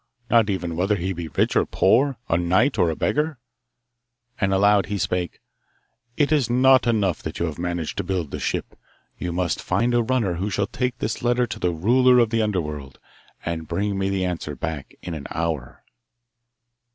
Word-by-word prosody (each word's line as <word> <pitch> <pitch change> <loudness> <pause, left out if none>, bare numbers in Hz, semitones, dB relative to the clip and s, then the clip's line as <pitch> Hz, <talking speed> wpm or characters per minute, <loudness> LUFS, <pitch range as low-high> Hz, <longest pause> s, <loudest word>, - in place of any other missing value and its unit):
Not 115 -3 +5
even 90 -4 -2
whether 95 +5 +1
he 95 0 -2
be 85 -2 -5
rich 80 - 0
or - - +4
poor 130 +6 +2
a - - +1
knight 95 +9 +2
or 90 -2 +4
a 80 - -2
beggar.' 150 - 0 1.0
And 100 -1 +1
aloud 100 +1 +4
he 100 +1 -2
spake: 90 +2 -2 0.8
It 145 0 +2
is 145 -6 +2
not 130 +1 +5
enough 105 -7 +1
that 80 - -6
you 85 - 0
have 80 -2 -5
managed 85 -2 -3
to - - -1
build 90 -5 -2
the - - -4
ship. - - -3 0.4
You 90 - -3
must 85 -1 -1
find 120 +1 0
a 120 - +4
runner 115 -6 0
who 100 +4 -2
shall 100 0 0
take 125 +3 -2
this - - -3
letter 120 +1 +2
to - - -7
the 90 - +1
ruler 125 +9 +4
of 115 -2 +3
the 115 -1 +2
Underworld, 75 -10 -3 0.5
and 80 -2 -3
bring 100 0 -1
me 95 0 0
the 95 -1 0
answer 85 -4 -3
back 75 0 -5
in 85 - -5
an 75 -3 -6
hour. 80 -6 -3
95 Hz, 190 wpm, -23 LUFS, 85-120 Hz, 1.0 s, Not